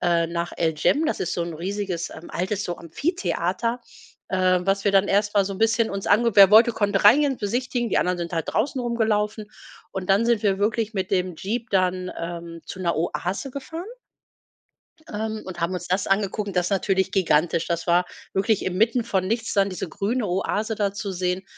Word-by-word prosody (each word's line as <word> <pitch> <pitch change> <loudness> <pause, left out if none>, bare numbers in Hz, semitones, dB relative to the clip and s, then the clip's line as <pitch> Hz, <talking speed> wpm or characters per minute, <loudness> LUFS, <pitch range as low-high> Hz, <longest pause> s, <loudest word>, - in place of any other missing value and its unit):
äh, 170 -1 +2
nach 170 0 -3
El 160 -2 +1
Jem. 295 - +2
Das - - -1
ist 180 - -1
so 170 - -1
'n 170 -1 -5
riesiges 185 0 -3
altes 185 +5 -4
so 175 - -3
Amphitheater, 230 - -2 0.5
ähm, 185 -1 +2
was 195 +1 +1
wir 200 - +2
dann 195 0 +4
erst 205 +1 +1
mal 200 - +4
so 195 - -4
'n - - -9
bisschen 225 0 +2
uns 195 0 -4
ange 225 +1 +3
Wer 195 -1 +9
wollte, 225 +3 +7
konnte 205 -3 0
reingehen 280 +6 +6
und 260 - -9
besichtigen. 240 +3 -1
Die - - +1
anderen 180 0 0
sind 170 0 -4
halt 165 -2 -2
draußen 260 +3 0
rumgelaufen. 215 -3 -1 0.4
Und 190 0 -4
dann 200 +4 +4
sind 235 -2 +2
wir 195 -1 +2
wirklich 220 +1 0
mit 190 -2 -2
dem 180 -2 0
Jeep 225 +5 -4
dann, 185 -1 +1
ähm, 170 0 -6
zu - - -8
'ner 175 -2 0
Oase 180 - -2
gefahren 320 +7 -7 1.3
ähm, 220 +1 -3
und 180 -2 -8
haben 170 +2 -1
uns 180 -1 -5
das 185 +2 0
angeguckt, 200 0 -1
das 180 - +2
ist - - -3
natürlich 190 -1 +1
gigantisch. 165 -3 +2
Das 170 0 -2
war 175 +1 +3 0.3
wirklich 200 +2 +1
inmitten 220 +6 +1
von 190 -5 0
nichts 225 +2 -1
da 200 -1 +4
diese 185 -2 -5
grüne 215 +6 -1
Oase 205 +4 -1
da 200 -2 0
zu 200 -1 -4
sehen, 180 +1 -1
195 Hz, 200 wpm, -24 LUFS, 180-220 Hz, 1.3 s, Wer